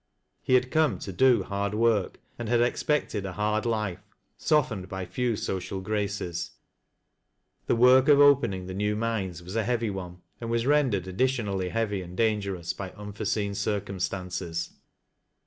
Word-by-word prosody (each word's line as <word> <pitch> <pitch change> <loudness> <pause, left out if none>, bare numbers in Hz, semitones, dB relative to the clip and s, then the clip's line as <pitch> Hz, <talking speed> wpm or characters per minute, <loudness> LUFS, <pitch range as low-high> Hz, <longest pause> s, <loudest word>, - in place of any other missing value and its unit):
He 130 - +2
had 125 0 +2
come 155 - +2
to 95 - -7
do 130 +4 +4
hard 100 0 -2
work, 110 -3 +1 0.2
and 120 -2 -4
had 120 0 +3
expected 120 -3 0
a 95 -2 -5
hard 105 +3 0
life, 105 -5 -1 0.4
softened 115 -11 +1
by 95 -1 -4
few 120 +5 -1
social 95 -1 -3
graces. 100 -3 -3 1.1
The - - +3
work 125 +2 +6
of 145 -1 +7
opening 140 -10 +4
the 95 - -6
new 105 +2 0
mines 105 -7 -2
was 90 +4 -8
a 115 - +1
heavy 115 -1 0
one, 90 -2 -7 0.2
and 115 - -5
was 115 0 0
rendered 135 -10 +2
additionally 100 -3 0
hea\y 105 -2 -1
and 90 +1 -10
dangerous 100 -6 0
by 95 -2 -6
unforeseen 105 0 -3
circumstances. 95 -4 -3
105 Hz, 150 wpm, -27 LUFS, 95-115 Hz, 1.1 s, of